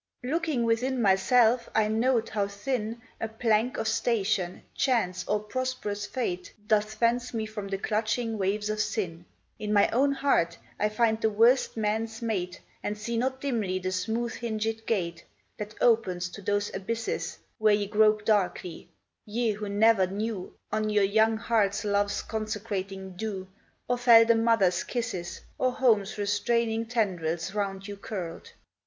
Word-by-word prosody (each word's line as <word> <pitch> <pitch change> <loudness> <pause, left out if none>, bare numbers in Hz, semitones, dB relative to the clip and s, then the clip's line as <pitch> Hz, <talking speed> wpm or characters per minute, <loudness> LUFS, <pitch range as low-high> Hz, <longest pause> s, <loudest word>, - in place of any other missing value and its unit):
Looking 305 -2 0
within 245 +3 +1
myself, 230 +4 +4
I 220 -1 +4
note 230 +1 +1
how 205 -2 0
thin 215 +2 -3 0.2
A 225 - -2
plank 225 +1 +1
of - - -1
station, 220 -5 0
chance, 225 -9 +1
or 210 - +1
prosperous 215 -2 -3
fate, 180 -8 -3
Doth 215 0 +1
fence 240 +1 +1
me 220 -1 -1
from 215 -2 -6
the 195 0 -2
clutching 220 +2 -1
waves 205 +2 0
of 215 - -3
sin; 175 -6 -2 0.3
In 210 0 -3
my 205 -1 +5
own 275 +4 +3
heart 170 -12 +1 0.2
I 210 - +2
find 220 +1 +1
the 220 - +3
worst 230 +4 +3
man's 220 +1 -1
mate, 185 -6 -2 0.2
And 210 - -3
see 230 +3 -4
not 260 +3 0
dimly 220 -9 -1
the 185 0 -3
smooth 225 +6 -1
hingèd 225 -1 -3
gate 170 -6 -1 0.4
That 210 0 -6
opes 185 -7 +2
to 200 - -10
those 205 +1 -1
abysses 225 +4 -3 0.2
Where 215 -1 +5
ye 205 0 -1
grope 215 0 +3
darkly, 185 -5 0 0.3
ye 225 +1 0
who 210 0 -5
never 205 -1 +4
knew 200 0 -4 0.2
On 215 0 0
your 210 -1 +3
young 220 +3 +3
hearts 220 -3 +1
love's 205 0 +1
consecrating 200 -3 -4
dew, 195 -1 -4 0.4
Or 245 0 0
felt 230 -2 +7
a - - +5
mother's 225 -6 +3
kisses, 225 -8 -4 0.2
Or 255 - +2
home's 215 -7 +2
restraining 225 +3 0
tendrils 180 -6 -1
round 195 -1 -3
you 205 0 -7
curled. 185 -5 -6
215 Hz, 155 wpm, -28 LUFS, 200-230 Hz, 0.4 s, felt